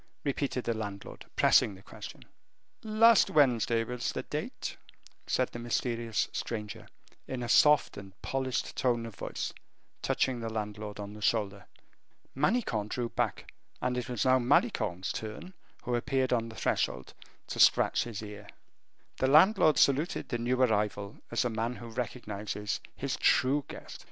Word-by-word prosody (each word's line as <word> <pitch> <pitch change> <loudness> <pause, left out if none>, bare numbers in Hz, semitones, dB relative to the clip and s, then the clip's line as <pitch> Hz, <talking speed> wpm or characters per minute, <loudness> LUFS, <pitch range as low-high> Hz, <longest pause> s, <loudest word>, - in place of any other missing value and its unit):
repeated 140 -3 -1
the 115 - 0
landlord, 100 -3 -7
pressing 100 - +4
the 95 - -16
question. - - -10 0.6
"Last 220 0 +5
Wednesday 120 - +3
was 125 +1 -3
the - - -4
date," - - -5 0.5
said 130 - +1
the 120 - -8
mysterious 120 -1 -1
stranger, 110 -1 -5 0.4
in 125 -2 -4
a - - -3
soft 150 +4 +5
and 95 -1 -11
polished 130 -1 -2
tone 120 -2 +1
of 115 - -8
voice, - - -4 0.5
touching 130 -2 0
the 115 -1 -3
landlord 105 -1 -5
on 100 0 -6
the 105 - -11
shoulder. 100 -3 0 0.7
Manicamp 135 - 0
drew 120 0 -2
back, - - -2 0.3
and 125 0 -1
it 125 0 -3
was 120 -1 -1
now 130 0 +5
Malicorne's 110 - +1
turn, 110 - -6 0.3
who 125 - -2
appeared 130 +1 +1
on 115 -1 0
the 110 - -11
threshold, 90 - -1 0.3
to - - -6
scratch - - +5
his 110 -3 -6
ear. 105 -1 -9 0.7
The 130 - +1
landlord 155 +1 +6
saluted 140 +5 +2
the 120 - -2
new 125 +2 0
arrival 105 -4 0
as 115 +2 0
a - - +1
man 115 +2 -2
who 120 -1 -9
recognizes 105 -3 -4 0.2
his - - -3
true 140 +2 +3
guest. - - -9
120 Hz, 150 wpm, -30 LUFS, 105-130 Hz, 0.7 s, landlord